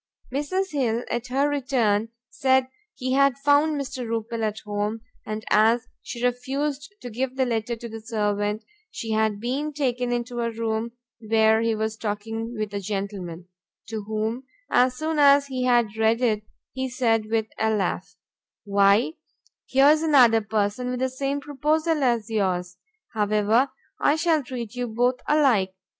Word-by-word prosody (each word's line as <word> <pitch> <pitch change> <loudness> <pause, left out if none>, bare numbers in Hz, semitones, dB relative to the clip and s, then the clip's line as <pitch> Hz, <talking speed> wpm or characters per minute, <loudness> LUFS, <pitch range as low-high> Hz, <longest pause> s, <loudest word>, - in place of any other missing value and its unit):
Mrs. 370 +8 -1
Hill 245 -5 0
at 240 +1 -2
her 270 +3 +1
return 245 -7 +1 0.2
said 260 -1 +2 0.3
she 255 -1 -3
had 275 -1 +3
found 290 +2 +3
Mr. 260 -2 -4
Rupil 230 0 -3
at 215 -1 -1
home, 210 +1 -3 0.3
and 215 0 -4
as 225 +3 +4 0.2
she 240 0 -4
refused 275 +5 -2
to 245 - -7
give 255 +3 -2
the 265 -1 +2
letter 235 -1 -1
to 235 +1 -8
the 225 -1 -8
servant, 210 -1 -1 0.3
she 225 - -5
had 220 -1 +1
been 270 +7 -2
taken 250 -4 -1
into 240 0 -2
a 235 - 0
room 225 0 -2 0.3
where 220 0 +3
he 230 -1 +1
was 220 0 -2
talking 225 +2 -4
with 215 -1 -3
a 200 - -2
gentleman, 195 -4 -5 0.4
to 220 -1 -3
whom, 220 +4 -2 0.3
as 250 0 +3
soon 315 +1 -1
as 280 0 +6
he 260 -2 -3
had 240 -4 +2
read 220 +1 +2
it, 215 -4 0 0.3
he 260 0 -3
said 225 -3 +1
with 225 -1 +1
a 220 - +2
laugh, 205 -5 -1 0.5
"Why 200 +4 +3 0.6
here's 285 +4 +5
another 255 -8 +5
person 215 +3 -1
with 250 0 -2
the 260 0 +1
same 275 +2 -2
proposal 300 +3 0
as 235 -4 +1
yours! 185 -5 -1 0.4
however, 215 +4 +2 0.3
I 290 - +3
shall 320 -1 +2
treat 245 -4 -6
you 245 -1 -3
both 245 +3 +1
alike." 245 -11 +3
235 Hz, 160 wpm, -24 LUFS, 215-265 Hz, 0.6 s, as